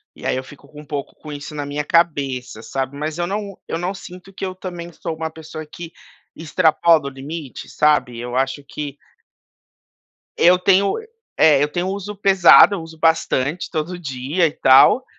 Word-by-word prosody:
E -, -, -12 dB
aí -, -, 0 dB
eu 130 Hz, -, -3 dB
fico 140 Hz, +1 st, -15 dB
com 150 Hz, 0 st, -12 dB
um -, -, -15 dB
pouco 145 Hz, 0 st, -5 dB
com 150 Hz, -, -9 dB
isso 145 Hz, +1 st, -8 dB
na 145 Hz, -, -4 dB
minha 145 Hz, +1 st, -3 dB
cabeça, 140 Hz, -9 st, 0 dB
sabe. 135 Hz, +3 st, -4 dB
Mas 155 Hz, +2 st, -4 dB
eu 175 Hz, -, -1 dB
não 200 Hz, 0 st, -4 dB
eu -, -, -3 dB
não 180 Hz, +3 st, -3 dB
sinto 185 Hz, +1 st, -12 dB
que 190 Hz, -, -9 dB
eu 185 Hz, -1 st, -5 dB
também 175 Hz, -2 st, -7 dB
sou 160 Hz, -, -5 dB
uma 160 Hz, 0 st, -4 dB
pessoa 155 Hz, 0 st, -9 dB
que 170 Hz, -1 st, -9 dB, 0.4 s
extrapola 160 Hz, 0 st, +2 dB
o -, -, -3 dB
limite, 140 Hz, +1 st, -8 dB
sabe. 140 Hz, -6 st, +1 dB
Eu 120 Hz, +1 st, -5 dB
acho 135 Hz, +2 st, -1 dB
que 145 Hz, -2 st, -6 dB, 1.4 s
eu 180 Hz, +1 st, +5 dB
tenho 195 Hz, +2 st, +3 dB, 0.4 s
é 145 Hz, -3 st, +5 dB
eu 145 Hz, -, +1 dB
tenho 175 Hz, +4 st, -2 dB
uso 200 Hz, +1 st, -5 dB
pesado, 195 Hz, 0 st, +6 dB
eu 175 Hz, -, -4 dB
uso 160 Hz, 0 st, -12 dB
bastante 160 Hz, -1 st, 0 dB
todo 175 Hz, +2 st, -3 dB
dia, 140 Hz, +3 st, -1 dB
e 155 Hz, -, -2 dB
tal, 135 Hz, -, +5 dB
155 Hz, 185 wpm, -20 LUFS, 140-175 Hz, 1.4 s, pesado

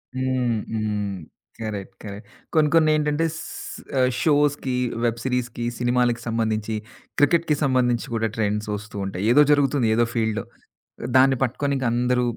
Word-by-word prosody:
హ్మ్, 130 Hz, -3 st, 0 dB, 0.2 s
హ్మ్, 105 Hz, -2 st, -2 dB, 0.5 s
correct. 100 Hz, -3 st, -5 dB
Correct. 100 Hz, 0 st, -8 dB, 0.3 s
కొన్ని 155 Hz, -1 st, +4 dB
కొన్ని 160 Hz, -1 st, +5 dB
ఏంటంటే 150 Hz, +1 st, +1 dB
స్ -, -, -6 dB, 0.6 s
ఆహ్, 125 Hz, 0 st, +4 dB
షోస్‌కి, 145 Hz, -3 st, +2 dB, 0.3 s
వెబ్ 115 Hz, 0 st, 0 dB
సీరీస్‌కి 125 Hz, -2 st, -2 dB
సినిమాలకి 120 Hz, -1 st, +1 dB
సంబంధించి 110 Hz, -1 st, -1 dB, 0.4 s
క్రికెట్‌కి 155 Hz, +1 st, +3 dB
సంబంధించి 125 Hz, -3 st, +1 dB
కూడా 115 Hz, 0 st, +1 dB
ట్రెండ్స్ 105 Hz, 0 st, -1 dB
ఒస్తూ 105 Hz, +1 st, -12 dB
ఉంటాయి. 95 Hz, 0 st, -4 dB
ఏదో 145 Hz, -, +7 dB
జరుగుతుంది 140 Hz, -4 st, +3 dB
ఏదో 120 Hz, +1 st, +3 dB
ఫీల్డ్‌లో. 110 Hz, -1 st, 0 dB, 0.7 s
దాన్ని 130 Hz, +1 st, +6 dB
పట్టుకొని 135 Hz, +2 st, 0 dB
ఇంక 130 Hz, -, -2 dB
అందరూ 125 Hz, +1 st, +1 dB
125 Hz, 135 wpm, -23 LUFS, 110-135 Hz, 0.7 s, ఏదో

